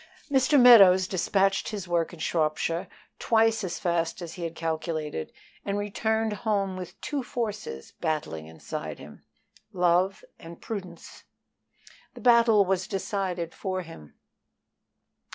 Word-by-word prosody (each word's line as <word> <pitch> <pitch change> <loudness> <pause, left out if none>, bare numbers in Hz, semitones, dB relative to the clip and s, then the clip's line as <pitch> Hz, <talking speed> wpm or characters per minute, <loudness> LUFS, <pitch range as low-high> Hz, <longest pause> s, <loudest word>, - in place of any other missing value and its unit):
MR. 270 +1 +4
MEADOWS 195 -7 +8
dispatched 195 +1 +1
his 200 -4 -5
work 170 -1 0
in 175 - -11
Shropshire 160 +1 -1 0.3
twice 225 -1 +2
as 180 - -3
fast 170 -1 -1
as 165 -1 -7
he 180 - -9
had 165 -1 -4
calculated, 160 - -3 0.3
and 200 0 -2
returned 220 +2 -1
home 200 -4 0
with 180 -1 -8
two 290 -2 -2
forces 215 - -5
battling 150 - -3
inside 80 0 -7
him 75 +1 -13 0.5
love 180 +2 +1
and 165 0 -11
prudence. 185 -6 -8 0.9
The - - -11
battle 235 -4 +5
was 190 0 -1
decided 190 -3 -3
for 185 -1 -3
him. 75 - -13
185 Hz, 125 wpm, -27 LUFS, 165-210 Hz, 0.9 s, MEADOWS